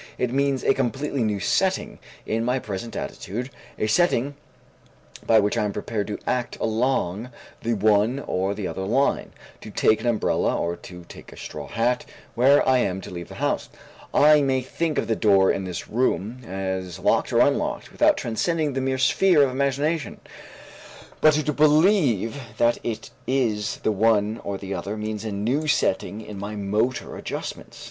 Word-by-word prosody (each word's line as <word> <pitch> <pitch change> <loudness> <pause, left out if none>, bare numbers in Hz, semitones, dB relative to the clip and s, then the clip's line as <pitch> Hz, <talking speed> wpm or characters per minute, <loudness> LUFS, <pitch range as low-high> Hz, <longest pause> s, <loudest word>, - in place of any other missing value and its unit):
It 125 -1 -1
means 140 -1 +1
a - - +4
completely 135 +1 -1
new 105 -2 0
setting - - 0 0.3
in 115 +1 -1
my 125 +2 +1
present 110 -1 -5
attitude, 125 +7 -5 0.3
a - - 0
setting 140 +1 +2 0.9
by 110 - +6
which 105 0 +1
I - - +1
am 105 - -1
prepared 105 0 -3
to 105 - -4
act 125 -1 -1
along 110 -2 0 0.3
the 115 0 0
one 105 +4 +3
or 95 +2 -1
the 100 -3 -3
other - - -5
line, 120 +9 +1 0.3
to - - -9
take 110 +1 +2
an 120 - -2
umbrella 115 -3 +1
or 85 0 -1
to 90 0 -11
take - - -13
a - - -13
straw 75 -2 -7
hat, 120 - 0 0.3
when 135 +5 +5
I 130 -1 +4
am 95 -5 0
to - - -9
leave 85 -1 -7
the - - -10
house. - - -1 0.4
I 150 0 +6
may 135 -2 +1
think 155 +4 -2
of - - +1
the 115 - 0
door 100 -3 +4
of 95 - -2
this 90 -2 -5
room 120 0 -1
as 95 -2 -4
locked - - +1
or - - +1
unlocked - - +1
without - - +3
transcending 150 +6 -1
the 135 - -1
mere 130 0 0
sphere 150 +4 +4
of 135 - +1
imagination, 140 +4 -1 1.0
but 155 -1 +6
to 150 0 0
believe 150 - +3 0.2
that 120 0 +3
it 115 -2 -4 0.2
is 110 -6 0
the - - +2
one 110 +1 +2
or 100 -1 -3
the 100 0 -6
other 100 +4 -4
means 105 0 -4
a 110 - -4
new 120 +10 -1
setting 105 -5 0
in 105 -2 -8
my 105 +2 -5
motor 105 +5 -1
adjustments. - - -6
115 Hz, 175 wpm, -24 LUFS, 100-135 Hz, 1.0 s, by